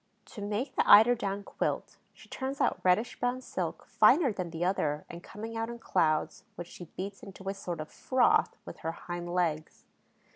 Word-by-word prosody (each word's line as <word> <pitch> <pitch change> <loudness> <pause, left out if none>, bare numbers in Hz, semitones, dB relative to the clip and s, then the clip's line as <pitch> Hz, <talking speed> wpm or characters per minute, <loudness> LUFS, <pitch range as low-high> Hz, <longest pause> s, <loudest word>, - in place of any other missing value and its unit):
To 210 - -7
make 210 +7 -3
the - - +1
eider 225 +4 +9
down 200 -4 -3
quilt, - - -3
she - - -17
turns 270 +1 -4
out - - +1
reddish 185 +6 +2
brown 245 +1 0
silk, 255 - -4
finer 285 -8 +4
than 185 -3 -4
the 165 +1 -2
other 150 -5 0
and 170 - -9
coming 225 +4 -8
out 225 0 -2
in 235 - -6
clouds 160 -8 0
which 175 0 -7
she 175 - -10
beats 195 +2 -5
into 195 -1 -11
a - - -1
sort 180 -4 -5
of 155 - -6
froth 255 -2 +2
with - - -9
her 165 - -3
hind 175 0 -6
legs. 160 -3 -1
195 Hz, 190 wpm, -30 LUFS, 175-230 Hz, -, eider